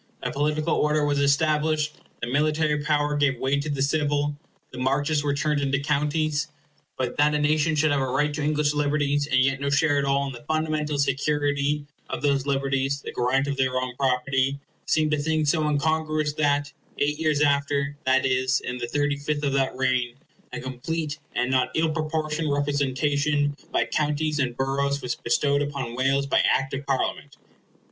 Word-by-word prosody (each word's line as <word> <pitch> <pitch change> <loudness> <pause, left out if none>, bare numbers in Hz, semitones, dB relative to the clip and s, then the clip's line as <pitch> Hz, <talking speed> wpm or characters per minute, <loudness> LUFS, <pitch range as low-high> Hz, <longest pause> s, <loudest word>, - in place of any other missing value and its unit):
A - - -1
political 150 +3 0
order 150 0 +2
was 145 -1 +1
established; 150 +1 +2 0.3
the 115 - -2
military 150 +3 +1
power 150 -1 +1
gave 140 -4 +1
way 135 +2 +1
to 145 +2 -3
the 140 -2 0
civil; 145 0 0 0.4
the 125 - -8
Marches 145 +3 +1
were 145 -1 0
turned 150 0 0
into 140 0 0
Counties. 150 +1 0 0.5
But 125 -1 -2
that 150 +1 +3
a - - +3
nation 155 +2 +2
should 155 0 +2
have 140 -1 +1
a 130 - 0
right 145 +3 0
to 150 - -3
English 150 0 +1
liberties, 145 -1 +1
and 130 -3 +2
yet 135 +1 +1
no 140 - 0
share 145 0 +3
at - - 0
all 140 0 +1
in 135 - -5
the 120 - -11
fundamental 155 -1 -1
security 145 +1 0 0.2
of - - -4
these 140 -1 +1
liberties—the 135 0 -1
grant 130 +3 +1
of 140 -1 -3
their 130 -1 +1
own 130 -1 -3
property—seemed 135 +4 0
a - - +2
thing 155 +1 0
so 155 +1 +2
incongruous 155 0 0
that, 145 -1 0 0.2
eight 150 +1 0
years 155 -2 +1
after, 140 0 +1
that 130 +1 +3
is, 130 +1 +2
in 125 0 -5
the 120 - -3
thirty 145 +2 0
fifth 145 +1 -2
of 140 -2 0
that 135 -1 +1
reign, 125 -2 0 0.4
a 125 - -5
complete 145 +5 -4 0.2
and 125 +1 0
not 130 -1 +2
ill 160 0 +2
proportioned 155 -1 -2
representation 145 +1 0 0.2
by - - +1
counties 150 0 -1
and 125 -3 -1
boroughs 140 +1 0
was 125 -1 -1
bestowed 140 +4 +1
upon 140 -5 -3
Wales 135 +2 +1
by 140 - +2
Act 135 +1 0
of 135 +1 -5
Parliament. 135 -2 -2
145 Hz, 180 wpm, -25 LUFS, 135-150 Hz, 0.5 s, that